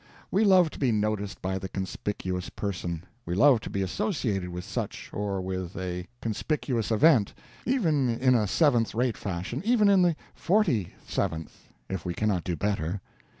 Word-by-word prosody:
We 200 - +3
love 185 -6 +5
to - - -10
be 130 -4 +2
noticed 105 -2 -1
by 95 +1 -1
the 95 0 -6
conspicuous 95 -1 -3
person; 90 -4 -4 0.2
we 85 - -3
love 130 +3 +6
to - - -7
be 100 - -1
associated 105 - -1
with 90 0 -5
such, - - -5
or 100 -2 -2
with 95 -1 -4
a 90 -1 -4 0.2
conspicuous 115 0 -1
event, 115 -2 +4 0.3
even 160 - +2
in 125 +2 +3
a 110 -4 +3
seventh 120 - +3
rate 120 0 +1
fashion, 95 - -4
even 220 -2 +4
in 195 -2 +6
the 175 -2 +3 0.2
forty 170 - +1
seventh, 80 -1 -3 0.2
if 95 -3 -4
we 90 -1 -3
cannot 105 -5 0
do 90 - -2
better. 100 -1 -1
105 Hz, 165 wpm, -28 LUFS, 95-145 Hz, 0.3 s, love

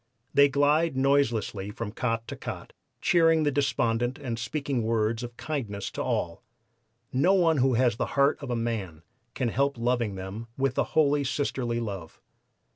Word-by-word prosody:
They 140 0 +6
glide 145 +2 +2
noiselessly 120 -7 +1
from 105 0 -5
cot 115 0 -2
to - - -5
cot - - -7 0.3
cheering 165 -2 +4
the 145 - +2
despondent 120 -2 0
and 125 -6 -4
speaking 140 +2 -2
words 110 0 0
of 120 -1 -7
kindness 115 -11 -4
to - - -4
all. 85 -1 -2 0.7
No 175 +10 +4
one 165 -4 +3
who 130 -1 +3
has 120 -2 +2
the - - -1
heart 140 +1 +4
of 140 - -6
a 120 - 0
man 105 -9 -3 0.3
can 125 - 0
help 140 +3 0
loving 115 -3 0
them 95 +5 -6
with 135 0 0
a - - +4
holy 145 -2 +4
sisterly 130 -3 -1
love. 100 -8 -6
125 Hz, 165 wpm, -27 LUFS, 115-140 Hz, 0.7 s, They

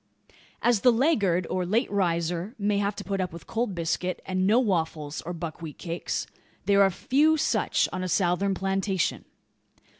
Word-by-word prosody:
As 240 -3 +4
the 250 - +6
laggard, 215 - +2
or 185 - -1
late 215 +8 0
riser, 175 +1 -1
may 205 -1 +1
have 200 0 0
to - - -6
put 195 -1 -2
up 180 - -2
with 170 0 -10
cold 225 -4 -2
biscuit, 170 +2 -2
and 185 0 0
no 220 +4 +5
waffles 160 - -1
or - - -2
buckwheat 165 -2 -6
cakes, 170 0 -3 0.4
there 200 -1 +4
are 195 - +6
few 295 - +2
such - - +1
on 185 - -3
a 185 - -3
Southern 190 +2 +1
plantation. 195 -1 -1
190 Hz, 170 wpm, -26 LUFS, 175-205 Hz, 0.4 s, the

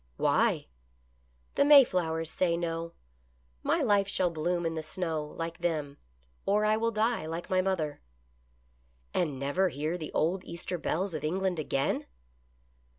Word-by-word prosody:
" - - -37
Why? - - +2 0.3
" 60 -1 -38
" 60 0 -38
The - - +6
Mayflowers 180 - +5
say 170 -2 +1
no. 165 0 -3 0.7
My - - +1
life 200 -1 +3
shall 185 -3 +1
bloom 170 +2 -1
in 165 - 0
the 160 - -3
snow, 160 0 -2
like 165 0 -4
them, 155 -5 -2 0.4
or 210 +2 +2
I 215 0 +4
will 230 +1 +1
die, 220 -5 0
like 165 +3 -5
my 185 0 +4
mother." 170 -6 -1 0.6
" 60 0 -38
And 155 -7 0
never 145 +8 +1
hear 155 +4 -3
the 155 - -6
old 180 +4 +1
Easter 170 +1 -5
bells 185 +4 -1
of - - -4
England 180 +2 0
again 135 -2 -1
165 Hz, 160 wpm, -30 LUFS, 150-185 Hz, 0.7 s, The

